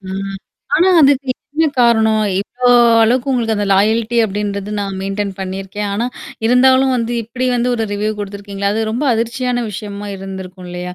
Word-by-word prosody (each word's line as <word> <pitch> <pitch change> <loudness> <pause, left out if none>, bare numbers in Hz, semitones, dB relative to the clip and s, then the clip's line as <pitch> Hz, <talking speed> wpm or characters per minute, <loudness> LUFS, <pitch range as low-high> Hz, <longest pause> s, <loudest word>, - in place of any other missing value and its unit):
அ. - - -23 0.7
ஆனா, 360 +3 +4
அதுக்கு 275 -2 +3 0.2
என்ன 320 +1 +2 0.2
காரணம்? 220 -2 +3 0.2
இவ்ளோ 245 +4 -1 0.3
அளவுக்கு 250 +4 +2
உங்களுக்கு 230 -3 0
அந்த 205 -1 -1
லாயால்டி 220 +4 +2
அப்டின்றது, 200 0 -3
நான் 195 -1 -3
மெயின்டெயின் 195 +1 -3
பண்ணியிருக்கேன். 195 +2 -4
ஆனா 230 +4 -1 0.4
இருந்தாலும் 260 +2 +4
வந்து 235 0 -2
இப்படி 250 +3 -3
வந்து 245 0 0
ஒரு 225 - -1
ரிவ்யூ 210 +1 -1
குடுத்துருக்கீங்களே? 200 0 -4
அது 220 - -1
ரொம்ப 240 +7 -2
அதிர்ச்சியான 245 +1 -1
விஷயமா 205 0 -7
இருந்திருக்கும் 190 -1 -8
இல்லையா? 180 0 -6
215 Hz, 155 wpm, -17 LUFS, 200-245 Hz, 0.7 s, ஆனா